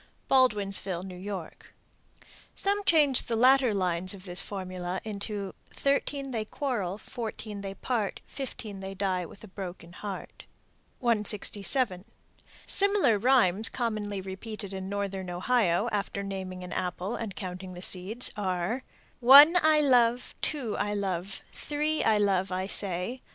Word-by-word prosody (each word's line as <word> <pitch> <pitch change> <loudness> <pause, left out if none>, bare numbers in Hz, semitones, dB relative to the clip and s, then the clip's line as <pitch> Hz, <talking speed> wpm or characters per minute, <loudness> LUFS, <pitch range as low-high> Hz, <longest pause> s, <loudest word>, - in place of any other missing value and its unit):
Baldwinsville, 200 -8 +2
N.Y. 185 -1 -6 1.0
Some 405 +1 +1
change 295 -7 +4
the 230 - 0
latter 255 +1 +5
lines 185 -1 0
of 185 -1 -12
this 180 -1 +1
formula 185 -2 -4
into 200 -2 -5 0.2
Thirteen 275 0 -1
they 225 -3 -1
quarrel, 215 -7 -3
Fourteen 220 -3 -6
they 195 -1 -5
part, 220 -2 -2
Fifteen 245 -7 -7
they 195 0 -6
die 185 -3 -1
with 200 - -14
a - - -9
broken 180 -3 -8
heart. 200 0 -7 0.6
167. 210 -2 0 0.6
Similar 400 - +3
rhymes 225 -4 +4
commonly 215 -5 -2
repeated 195 +1 -6
in 190 0 -5
northern 195 -2 -3
Ohio, 190 +1 +1
after 200 -1 -2
naming 190 -2 -5
an 180 - -7
apple 185 +3 -3
and 215 -5 -5
counting 185 -1 -6
the 180 - -8
seeds, 195 +8 +1
are, 190 +4 -2 0.4
One 280 +7 +9
I 310 -1 +5
love, 245 -3 +3
Two 270 -8 -1
I 205 0 -1
love, 195 -1 -3
Three 300 +1 -1
I 220 -1 +4
love, 195 -2 +1
I 185 +1 -1
say. 195 +5 -2
205 Hz, 135 wpm, -28 LUFS, 185-245 Hz, 1.0 s, One